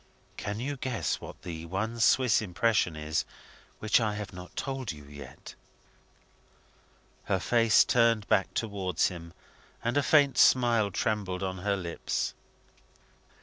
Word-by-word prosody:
"Can 100 Hz, +1 st, -4 dB
you 140 Hz, +3 st, -3 dB
guess 125 Hz, -2 st, -2 dB
what -, -, -11 dB
the 85 Hz, -1 st, -6 dB
one 110 Hz, +6 st, -3 dB
Swiss 120 Hz, 0 st, +4 dB
impression 100 Hz, -3 st, +1 dB
is 75 Hz, +1 st, -1 dB, 0.5 s
which 110 Hz, +2 st, +3 dB
I 105 Hz, -2 st, 0 dB
have 105 Hz, -2 st, -6 dB
not 90 Hz, 0 st, -11 dB
told 135 Hz, -5 st, -3 dB
you 75 Hz, -2 st, -11 dB
yet?" 70 Hz, -2 st, -11 dB, 1.7 s
Her 95 Hz, -, +1 dB
face 115 Hz, +2 st, +4 dB
turned 115 Hz, -3 st, +2 dB
back 95 Hz, -, +2 dB
towards 95 Hz, -6 st, 0 dB
him, 85 Hz, -2 st, -9 dB, 0.5 s
and 120 Hz, +4 st, 0 dB
a -, -, +4 dB
faint 145 Hz, -1 st, +3 dB
smile 120 Hz, -5 st, +4 dB
trembled 100 Hz, -2 st, -2 dB
on 95 Hz, -1 st, -3 dB
her 100 Hz, +2 st, 0 dB
lips. 85 Hz, -3 st, -3 dB
105 Hz, 135 wpm, -29 LUFS, 90-115 Hz, 1.7 s, Swiss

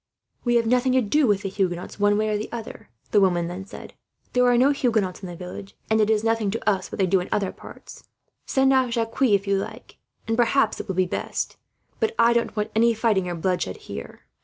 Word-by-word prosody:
"'We 240 Hz, 0 st, +2 dB
have 235 Hz, -1 st, +3 dB
nothing 250 Hz, +2 st, +2 dB
to 260 Hz, -, +4 dB
do 280 Hz, +6 st, +2 dB
with 205 Hz, -1 st, +1 dB
the 195 Hz, -, -2 dB
Huguenots, 185 Hz, -1 st, -3 dB
one 205 Hz, 0 st, +3 dB
way 215 Hz, 0 st, 0 dB
or 210 Hz, 0 st, -1 dB
other,' 230 Hz, -, -8 dB, 0.2 s
the 205 Hz, -, +4 dB
woman 180 Hz, 0 st, 0 dB
said. -, -, -10 dB, 0.4 s
'There 250 Hz, 0 st, +4 dB
are 245 Hz, -1 st, +4 dB
no 265 Hz, +4 st, +5 dB
Huguenots 220 Hz, -10 st, 0 dB
in 190 Hz, -, -6 dB
this 175 Hz, -1 st, -8 dB
village, 180 Hz, +2 st, -9 dB
and 220 Hz, 0 st, +4 dB
it 215 Hz, -, +2 dB
is 215 Hz, -1 st, +2 dB
nothing 225 Hz, -2 st, +1 dB
to 225 Hz, +2 st, -5 dB
us 190 Hz, -3 st, 0 dB
what -, -, -6 dB
they 195 Hz, -, +2 dB
do 185 Hz, +1 st, +2 dB
in 180 Hz, -, -5 dB
other 195 Hz, -2 st, 0 dB
parts. -, -, -13 dB, 0.4 s
Send 265 Hz, 0 st, +3 dB
off 260 Hz, -2 st, +3 dB
Jacques 230 Hz, +1 st, -3 dB
if 205 Hz, -6 st, +3 dB
you 200 Hz, 0 st, +1 dB
like, -, -, -8 dB, 0.3 s
and 225 Hz, -, +1 dB
perhaps 240 Hz, +4 st, +2 dB
it -, -, -6 dB
will 190 Hz, -, -3 dB
be 185 Hz, 0 st, +2 dB
best; 180 Hz, -, -4 dB, 0.4 s
but 450 Hz, 0 st, 0 dB
I 235 Hz, 0 st, +5 dB
don't 235 Hz, -2 st, 0 dB
want 210 Hz, 0 st, -2 dB
any 230 Hz, +1 st, +4 dB
fighting 210 Hz, -5 st, +1 dB
or 175 Hz, -, -3 dB
bloodshed 170 Hz, -, -1 dB
here.' -, -, -9 dB
215 Hz, 230 wpm, -24 LUFS, 190-235 Hz, 0.4 s, no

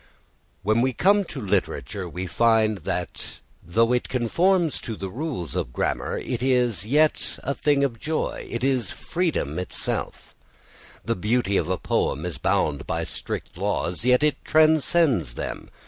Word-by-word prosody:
When 110 Hz, +3 st, +3 dB
we 130 Hz, +1 st, +1 dB
come 200 Hz, -, +4 dB
to 150 Hz, -, -7 dB
literature 100 Hz, -3 st, -2 dB
we 90 Hz, +3 st, -4 dB
find 110 Hz, +2 st, +3 dB
that -, -, -4 dB, 0.2 s
though 115 Hz, +7 st, +2 dB
it 125 Hz, -, 0 dB
conforms 165 Hz, -, +2 dB
to 115 Hz, -, -5 dB
rules 100 Hz, -, -4 dB
of -, -, -2 dB
grammar -, -, -1 dB
it 120 Hz, -1 st, -3 dB
is 125 Hz, -7 st, +2 dB
yet 150 Hz, +5 st, +2 dB
a 140 Hz, -, -1 dB
thing 145 Hz, -1 st, +2 dB
of 120 Hz, -5 st, -1 dB
joy, 155 Hz, +4 st, -2 dB
it 120 Hz, +1 st, -4 dB
is 130 Hz, -6 st, +1 dB
freedom 160 Hz, -, -2 dB
itself. 90 Hz, -, -3 dB, 0.7 s
The -, -, 0 dB
beauty 105 Hz, +1 st, +1 dB
of 90 Hz, -, +1 dB
a 95 Hz, -, +1 dB
poem 75 Hz, -1 st, -1 dB
is 85 Hz, -7 st, -4 dB
bound 70 Hz, -2 st, 0 dB
by -, -, -1 dB
strict -, -, -5 dB
laws, 90 Hz, +4 st, -1 dB
yet 125 Hz, +3 st, +4 dB
it 150 Hz, -1 st, +1 dB
transcends 155 Hz, -, +3 dB
them. -, -, -5 dB
120 Hz, 150 wpm, -24 LUFS, 95-145 Hz, 0.7 s, come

